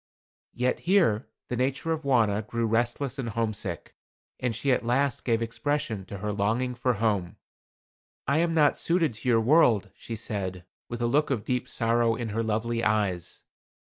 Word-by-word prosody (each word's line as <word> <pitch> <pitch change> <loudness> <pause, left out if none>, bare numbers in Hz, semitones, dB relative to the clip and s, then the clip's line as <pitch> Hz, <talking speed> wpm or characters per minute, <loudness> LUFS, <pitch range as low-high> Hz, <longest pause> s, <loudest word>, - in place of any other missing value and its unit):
Yet 125 +1 0
here 160 - +3 0.2
the 125 - -3
nature 135 +6 -1
of 160 -1 -1
Wauna 115 -7 +2
grew 115 -1 -1
restless 120 +4 0
and 120 -3 -2
homesick, 110 -6 -3 0.5
and 125 -3 -1
she 135 +4 0
at 125 - +2
last 130 +3 +1
gave 115 -2 +1
expression 115 -3 -2
to 100 - -7
her 105 +2 -3
longing 115 +5 0
for 125 +1 0
home. 100 -5 -1 0.9
"I 140 +4 +2
am 165 0 +1
not 150 -3 +4
suited 165 -6 +1
to 110 +4 -4
your 115 -2 +4
world," 120 -5 +4
she 115 - -7
said, 95 -4 -4 0.2
with 120 0 -3
a - - +3
look 145 +6 +2
of 125 -6 -1
deep 125 0 -1
sorrow 115 0 +2
in 115 -1 -4
her 110 +2 -1
lovely 115 +1 -1
eyes. 100 -6 -1
115 Hz, 175 wpm, -27 LUFS, 110-130 Hz, 0.9 s, not